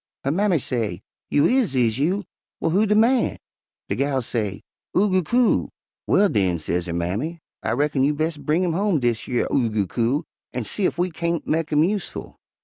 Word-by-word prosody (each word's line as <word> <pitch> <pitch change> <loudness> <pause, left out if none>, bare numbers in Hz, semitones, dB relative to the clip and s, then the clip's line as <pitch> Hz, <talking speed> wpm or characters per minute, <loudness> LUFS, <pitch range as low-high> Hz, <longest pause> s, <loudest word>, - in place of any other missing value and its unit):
Her 135 - 0
mammy 190 +1 +2
say, 110 - -2 0.3
'You 145 - +3
is, 245 - +2
is 120 -1 +2
you? 185 +8 +1 0.4
Well, - - 0
who 205 +5 +3
de 210 - +3
man?' 235 +3 +3 0.5
De - - -1
gal 135 -1 0
say 105 -4 -2 0.3
'Oo 200 +1 +3
goo 185 0 +3
coo.' 240 +7 +2 0.4
'Well, 205 +2 +4
den,' 95 - +1
sez 85 +2 -2
her - - -3
mammy, 100 - -2 0.2
'I 115 - -1
reckon 140 +1 +1
you 145 +2 +2
bes' 155 +1 -1
bring 165 +4 0
home 195 -2 +1
dish 120 -3 -1
yer 120 -2 0
Oo 120 -4 +2
goo 105 -2 0
coo 120 - 0 0.3
an' 125 -1 -2
see 185 - 0
ef - - -4
we 180 +1 0
kain't 170 +1 -2
mek 160 0 0
him 150 0 +4
useful. 195 +1 -3
150 Hz, 195 wpm, -23 LUFS, 120-185 Hz, 0.5 s, Well